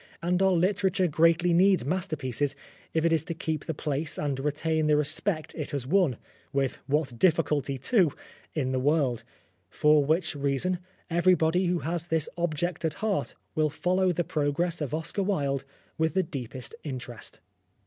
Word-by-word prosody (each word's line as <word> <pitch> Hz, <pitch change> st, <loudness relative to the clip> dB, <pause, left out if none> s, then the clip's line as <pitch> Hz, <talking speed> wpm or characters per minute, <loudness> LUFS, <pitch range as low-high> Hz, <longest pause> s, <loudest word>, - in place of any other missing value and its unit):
And 180 Hz, +2 st, 0 dB
our 190 Hz, 0 st, +4 dB
literature 185 Hz, +1 st, +2 dB
greatly 165 Hz, +2 st, +3 dB
needs 185 Hz, -3 st, +4 dB
masterpieces 145 Hz, -5 st, -1 dB, 0.4 s
if 160 Hz, 0 st, +1 dB
it 165 Hz, -, +3 dB
is 160 Hz, -, +2 dB
to 170 Hz, -2 st, -4 dB
keep 160 Hz, -2 st, -3 dB
the 160 Hz, -, -2 dB
place 150 Hz, +1 st, -2 dB
and 140 Hz, -3 st, -1 dB
retain 155 Hz, +2 st, 0 dB
the 150 Hz, -1 st, +4 dB
respect 155 Hz, +3 st, 0 dB
it 155 Hz, -4 st, -5 dB
has 140 Hz, -3 st, -3 dB
won 160 Hz, -, +2 dB, 0.3 s
(with 135 Hz, -2 st, 0 dB
what 140 Hz, -4 st, 0 dB
difficulty, 150 Hz, -5 st, +2 dB
too 175 Hz, -, +3 dB, 0.2 s
!) -, -, -27 dB
in 130 Hz, -1 st, -1 dB
the 130 Hz, -, 0 dB
world. 135 Hz, -4 st, +1 dB, 0.5 s
For 150 Hz, +4 st, +4 dB
which 160 Hz, +2 st, +1 dB
reason 145 Hz, +6 st, 0 dB, 0.3 s
everybody 175 Hz, 0 st, +3 dB
who 175 Hz, -1 st, 0 dB
has 170 Hz, +1 st, -2 dB
this 160 Hz, -3 st, +1 dB
object 175 Hz, 0 st, -2 dB
at 160 Hz, -2 st, 0 dB
heart 215 Hz, -3 st, -1 dB, 0.2 s
will 155 Hz, -1 st, +2 dB
follow 185 Hz, +4 st, +1 dB
the 175 Hz, 0 st, 0 dB
progress 160 Hz, +3 st, -1 dB
of 150 Hz, 0 st, -2 dB
Oscar 160 Hz, +5 st, -2 dB
Wilde 140 Hz, -9 st, 0 dB, 0.3 s
with 160 Hz, +2 st, +1 dB
the 190 Hz, -, +3 dB
deepest 130 Hz, -5 st, -6 dB
interest. 125 Hz, -5 st, -6 dB
160 Hz, 165 wpm, -28 LUFS, 140-175 Hz, 0.5 s, our